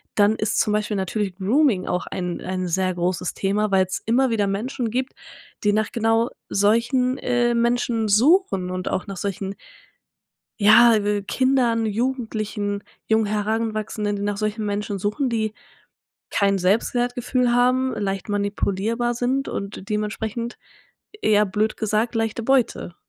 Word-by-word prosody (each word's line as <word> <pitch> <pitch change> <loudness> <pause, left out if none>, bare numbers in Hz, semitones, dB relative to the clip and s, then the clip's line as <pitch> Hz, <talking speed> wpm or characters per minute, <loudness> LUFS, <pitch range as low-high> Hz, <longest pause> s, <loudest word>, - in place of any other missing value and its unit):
dann 210 +1 +4
ist 215 0 -1
zum 210 - +2
Beispiel 210 0 -1
natürlich 190 0 -2
Grooming 210 +1 +2
auch 180 - -2
ein 180 -1 -4
ein 185 0 -3
sehr 185 +1 0
großes 175 0 -1
Thema, 205 +2 0
weil's 190 -1 +1
immer 250 +4 +3
wieder 210 -3 +1
Menschen 230 +4 -2
gibt, 255 +3 -2 0.5
die 205 0 +3
nach 215 +1 0
genau 225 +1 +1 0.2
solchen, 240 +5 +2
äh, 240 -1 +1
Menschen 235 -1 +1
suchen 215 - +3
und 185 0 -3
auch - - -2
nach 195 -1 -6
solchen, 195 +1 -4 1.0
ja, 225 +2 +7
äh, 205 -1 0
Kindern, 240 +1 +1
Jugendlichen, 215 -3 -2 0.2
jungen 220 0 +3
Heranwachsenden, 215 0 -1
die - - -5
nach 205 -1 -1
solchen 215 +1 -2
Menschen 205 0 -2
suchen, 210 +8 -1
die 220 -2 -1 0.8
kein 200 -1 +2
Selbstwertgefühl 245 +5 +1
haben, 255 +2 +2
leicht 195 -1 -3
manipulierbar 205 +3 -1
sind 255 +3 0
und 200 -1 -6
dementsprechend, 215 +2 -3 0.6
eher 210 -1 +4
blöd 210 +3 -1
gesagt, 220 +2 0
leichte 225 0 -1
Beute. 250 -8 +1
215 Hz, 140 wpm, -23 LUFS, 200-235 Hz, 1.0 s, ja